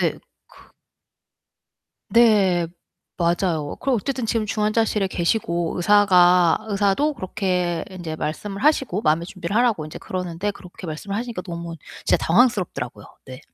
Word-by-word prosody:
네. - - 0 0.4
크 - - -20 1.4
네 200 -7 +4 0.5
맞아요. 170 -3 0
그리고 270 -1 +1
어쨌든 250 +2 -2
지금 225 -1 0
중환자실에 215 -1 0
계시고 170 -2 -1
의사가 180 -3 +5
의사도 205 +8 +1
그렇게 180 - -2
인제 175 -4 -6
말씀을 195 +7 -4
하시고 270 - +2
마음의 160 0 +1
준비를 185 +1 -5
하라고 225 -10 +2
인제 155 - -8
그러는데 180 +2 -3
그렇게 185 -1 -12
말씀을 165 +6 -5
하시니까 230 -3 -4
너무 170 -2 -6 0.3
진짜 - - +4
당황스럽더라고요. 175 - +1 0.2
네. 130 -1 -9
185 Hz, 340 characters per minute, -22 LUFS, 170-215 Hz, 1.4 s, 의사가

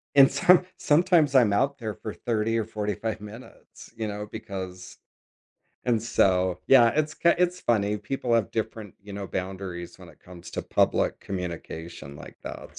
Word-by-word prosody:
and 135 -1 +8
some 180 +6 +5
sometimes 155 -2 +3
I'm 115 -6 +5
out 140 +6 +1
there 110 -3 -4
for 110 - -7
30 115 -1 -1
or 110 - 0
45 105 0 -3
minutes, 105 +4 -12
you 110 -1 -3
know, 105 0 -5
because 95 -3 -7 0.9
And 115 -3 +1
so, 90 -5 +2
yeah, 120 -3 +7
it's 155 0 0
k 170 - +3
it's 180 0 +1
funny, 105 -2 +1
people 120 +3 -2
have 115 -4 +1
different, 110 -3 -4
you 100 - -10
know, 100 0 -5
boundaries 90 -2 -5
when 90 -2 -13
it - - -18
comes 90 -1 -12
to - - -3
public - - +1
communication 85 -5 -6
like - - -12
that, - - -9
105 Hz, 165 wpm, -26 LUFS, 95-125 Hz, 0.9 s, and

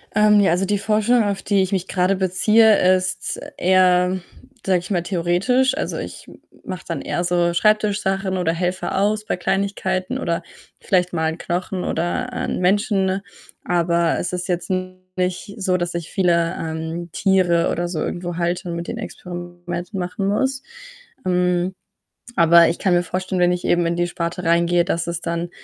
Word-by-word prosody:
Ähm, 210 -1 +5
ja, 195 - +4
also, 180 +3 +1
die 205 +1 0
Forschung, 220 +3 +2
auf 200 -1 -2
die 200 -1 +2
ich 190 +1 -1
mich 190 -1 -1
grade 185 +1 +1
beziehe, 190 +1 +4
ist 185 0 -3 0.2
eher, 185 0 +3 0.5
sage 185 -2 +3
ich 180 +3 -10
mal, 175 -4 0
theoretisch. 200 - +1
Also, - - -2
ich - - -7
m - - -14 0.3
mache 185 - -6
dann 165 -4 -3
eher 175 - -2
so 175 -1 +1
Schreibtisch-Sachen 200 -1 +1
oder 170 -2 0
helfe 180 +2 -2
aus 210 +2 +1
bei - - -2
Kleinigkeiten 190 0 -1
oder 170 0 -2 0.4
vielleicht 180 -2 +1
mal 160 -1 +1
‘n 160 - -5
Knochen 180 +1 -3
oder 210 +10 -2
‘n - - -3
Menschen, 195 +2 +2
ne, 190 +1 -1 0.4
aber 170 -1 +1
es 180 - -3
ist 180 +1 -3
jetzt 175 0 -2 0.5
nicht 185 +2 -2
so, 185 -2 +1
dass 175 0 -3
ich 170 -2 -4
viele, 170 -2 +2
ähm, 160 +1 -4
Tiere 180 -4 +2
oder 175 +1 -1
so 175 -2 -4
irgendwo 175 -1 -3
halte 175 +1 -1
und 170 - -3
mit 170 0 -5
denen - - -5
Experimente 175 +1 -6
machen 185 +2 -2
muss. 265 +6 0 0.6
Hm, 180 0 +1 0.6
aber 170 0 +6
ich 170 - -2
kann 185 -3 +2
mir 175 - +3
vorstellen, 185 +2 -2
wenn 180 0 +4
ich 180 - -3
eben 175 -1 +2
in 170 - 0
die 175 0 +1
Sparte 170 +1 -4
reingehe, 170 +1 +3
dass 170 -2 -1
es 170 0 -3
dann 170 0 -3
180 Hz, 180 wpm, -21 LUFS, 175-195 Hz, 0.6 s, aber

